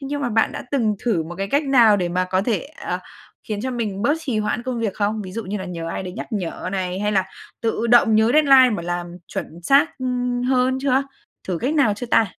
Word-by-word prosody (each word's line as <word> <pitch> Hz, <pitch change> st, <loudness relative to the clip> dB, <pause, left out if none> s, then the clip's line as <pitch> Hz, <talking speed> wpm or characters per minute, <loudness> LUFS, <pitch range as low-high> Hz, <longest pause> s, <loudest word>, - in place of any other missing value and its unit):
thế 275 Hz, -, -6 dB
nhưng 285 Hz, +1 st, -3 dB
mà 245 Hz, -, 0 dB
bạn 225 Hz, 0 st, +2 dB
đã -, -, -6 dB
từng 230 Hz, -7 st, +1 dB
thử 200 Hz, -9 st, +1 dB
một 170 Hz, +2 st, -8 dB
cái 195 Hz, -, -1 dB
cách 285 Hz, +2 st, +2 dB
nào 235 Hz, -6 st, +6 dB
để 180 Hz, -2 st, -1 dB
mà 180 Hz, +1 st, 0 dB
có 185 Hz, +1 st, 0 dB
thể, 225 Hz, -2 st, -1 dB, 0.2 s
ờ, -, -, -3 dB, 0.5 s
khiến 210 Hz, -1 st, -2 dB
cho 260 Hz, -, -2 dB
mình 215 Hz, -5 st, -3 dB
bớt 290 Hz, +5 st, +3 dB
trì 255 Hz, -8 st, -2 dB
hoãn 215 Hz, +2 st, -1 dB
công 250 Hz, -2 st, -3 dB
việc 215 Hz, -4 st, -1 dB
không? 210 Hz, +1 st, -1 dB
Ví 185 Hz, -1 st, -8 dB
dụ 230 Hz, +1 st, -4 dB
như 200 Hz, +2 st, -4 dB
là 190 Hz, -, -5 dB
nhờ 170 Hz, -2 st, -5 dB
ai 170 Hz, -, -4 dB
đấy 180 Hz, -1 st, -6 dB
nhắc -, -, -6 dB
nhở 185 Hz, -2 st, -3 dB
này 185 Hz, -1 st, -2 dB
hay 210 Hz, 0 st, 0 dB
là 190 Hz, -2 st, +2 dB, 0.4 s
tự 230 Hz, 0 st, -1 dB
động 235 Hz, -2 st, +5 dB
nhớ 220 Hz, +2 st, +4 dB
deadline 270 Hz, -4 st, +6 dB
mà 200 Hz, -6 st, -2 dB
làm 175 Hz, 0 st, -3 dB, 0.2 s
chuẩn 170 Hz, +2 st, -6 dB
xác, 275 Hz, -, +3 dB
ưm, 250 Hz, -1 st, -1 dB
hơn 255 Hz, 0 st, +2 dB
chưa? 270 Hz, 0 st, +2 dB, 0.5 s
Thử 175 Hz, -3 st, -1 dB
cách 275 Hz, +6 st, -1 dB
nào 265 Hz, -9 st, +3 dB
chưa 245 Hz, +4 st, -6 dB
ta? 225 Hz, -1 st, +3 dB
220 Hz, 255 wpm, -21 LUFS, 190-255 Hz, 0.5 s, nào